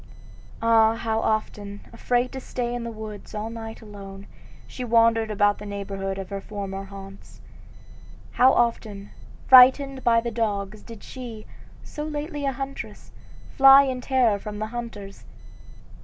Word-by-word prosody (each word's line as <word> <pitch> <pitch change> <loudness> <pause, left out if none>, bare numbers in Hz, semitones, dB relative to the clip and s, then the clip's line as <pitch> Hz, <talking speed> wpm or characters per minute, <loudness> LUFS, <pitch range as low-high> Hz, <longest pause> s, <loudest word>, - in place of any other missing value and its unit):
Ah, 225 -1 +4
how 225 -1 -1
often, 205 -2 -2
afraid 245 +2 0
to 265 - -6
stay 245 -2 -4
in 245 -1 -4
the 235 - -4
woods 215 -1 -9
all 215 +2 -4
night 225 0 -8
alone, 200 -2 -10 0.4
she 255 - -7
wandered 230 -1 +3
about 205 -1 +2
the 210 - -8
neighborhood 195 -1 -4
of 195 0 -7
her 195 0 -4
former 195 -1 -6
haunts; 195 0 -12 0.9
how 255 +1 +5
often, 220 -5 -1 0.4
frightened 265 +1 +7
by 230 -1 +4
the 235 0 -4
dogs, 210 -2 -2
did 230 -3 -12
she, 235 -4 -9 0.4
so 300 - -7
lately 295 -1 -4
a - - +1
huntress, 270 +1 -7 0.4
fly 270 0 +8
in 260 -2 -3
terror 245 -6 +2
from 210 +1 -7
the 215 - -3
hunters! 210 -5 -7
225 Hz, 145 wpm, -24 LUFS, 205-245 Hz, 0.9 s, fly